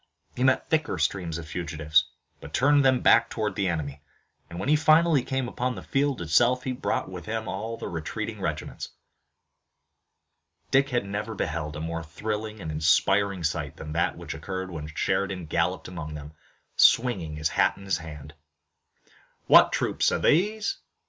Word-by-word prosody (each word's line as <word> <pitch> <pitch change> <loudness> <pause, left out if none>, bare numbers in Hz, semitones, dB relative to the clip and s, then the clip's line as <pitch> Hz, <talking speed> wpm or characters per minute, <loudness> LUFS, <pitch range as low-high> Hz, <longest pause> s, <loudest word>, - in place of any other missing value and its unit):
He 125 - -1
met 130 0 +3
thicker 155 -2 0
streams 85 -5 -1
of 85 -2 -8
fugitives, 80 -2 +1 0.3
but - - -7
turned 145 +4 +4
them 130 -2 +3
back 115 0 +5
toward 110 -2 -2
the 100 -2 -1
enemy, 75 -5 -3 0.5
and 85 - -7
when 95 - -3
he 150 - +5
finally 155 -1 +4
came 130 0 -2
upon 125 +1 -2
the - - -8
field 135 -7 0
itself 125 +11 +3
he 130 - -2
brought 130 0 -2
with 90 -2 -9
him 110 0 -3
all 115 +1 -4
the - - -6
retreating 80 -2 -5
regiments. - - -4 1.8
Dick 135 +1 +3
never 105 +3 -4
beheld 80 -4 -3
a - - -5
more 80 +1 -3
thrilling 105 +6 -5
and 80 -4 -5
inspiring 95 +5 +2
sight 75 -1 -2
than 75 -1 -8
that 85 - 0
which - - -6
occurred 95 -1 -5
when 75 -3 -6
Sheridan 95 +3 -1
galloped 85 +4 -1
among 80 -4 -7
them, 75 +1 -9 0.4
swinging 95 -11 +3
his 75 +1 -1
hat - - +2
in 100 - -12
his 95 -4 0
hand. 75 -3 -10 1.1
"What - - +7
troops - - +1
are - - +1
these?" 210 - +1
95 Hz, 165 wpm, -26 LUFS, 80-125 Hz, 1.8 s, What